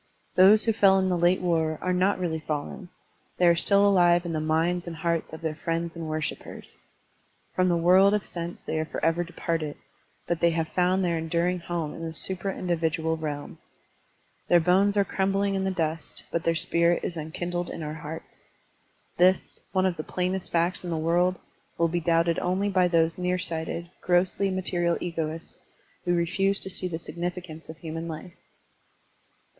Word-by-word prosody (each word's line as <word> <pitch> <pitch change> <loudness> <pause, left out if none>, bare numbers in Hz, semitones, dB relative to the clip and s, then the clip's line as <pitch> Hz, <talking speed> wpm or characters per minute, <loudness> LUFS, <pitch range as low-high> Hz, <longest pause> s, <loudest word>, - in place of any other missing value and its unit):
Those 200 +4 +7
who 225 - +2
fell 195 -3 +5
in 190 0 +1
the 180 - +1
late 175 +2 +3
war 160 -3 +1
are 185 - -1
not 185 +2 +2
really 170 -3 -2
fallen; 155 +4 -5 0.5
they 180 - +3
are 170 -1 +6
still 200 +3 +4
alive 175 -3 +4
in 170 - -3
the 155 - 0
minds 165 +3 0
and 170 - -5
hearts 170 0 -1
of 160 - -9
iheir 160 -1 -2
friends 165 +1 -3
and 165 -1 -5
worshipers. 155 -1 -5 0.8
From 185 0 +3
the 170 - +2
world 185 +4 +5
of 210 - -2
sense 170 0 -6
they 160 - -2
are 155 - -1
forever 165 +2 0
departed, 165 -3 -3 0.5
but 170 -1 -1
they 170 - +4
have 165 -1 -1
found 185 +2 +1
their 170 -2 0
enduring 170 +3 0
home 170 -3 -3
in 165 - -8
the 165 -1 -4
supra 190 +3 -2
individual 160 -2 0
realm. 150 -2 -5 0.9
Their 175 - +6
bones 195 +4 +3
are 200 - +4
crumbling 195 +1 0
in 190 0 -1
the - - +1
dust, 165 -3 -3
but 170 - -2
their 165 0 +2
spirit 170 +2 +2
is 175 - -3
enkindled 175 +3 -4
in 165 - -6
our 150 0 -4
hearts. 160 +1 -9 0.7
This, 185 +1 +2
one 185 0 +2
of 180 -3 0
the 155 - -4
plainest 185 +2 -2
facts 170 +2 +1
in 175 - -5
the 165 - -1
world, 175 +3 +2 0.4
will 170 - +3
be 175 +1 0
doubted 165 0 +2
only 185 +3 0
by 185 -2 +3
those 165 0 +2
near 180 0 0
sighted, 170 0 -4
grossly 180 +2 +2
material 175 -2 0
egoists 165 -1 -5 0.4
who 175 0 +2
refuse 195 +4 +1
to 190 - -3
see 185 0 -1
the 165 -2 -4
significance 175 -1 -6
of 160 - -8
human 165 0 -6
life. 165 +2 -7
175 Hz, 180 wpm, -26 LUFS, 165-185 Hz, 0.9 s, Those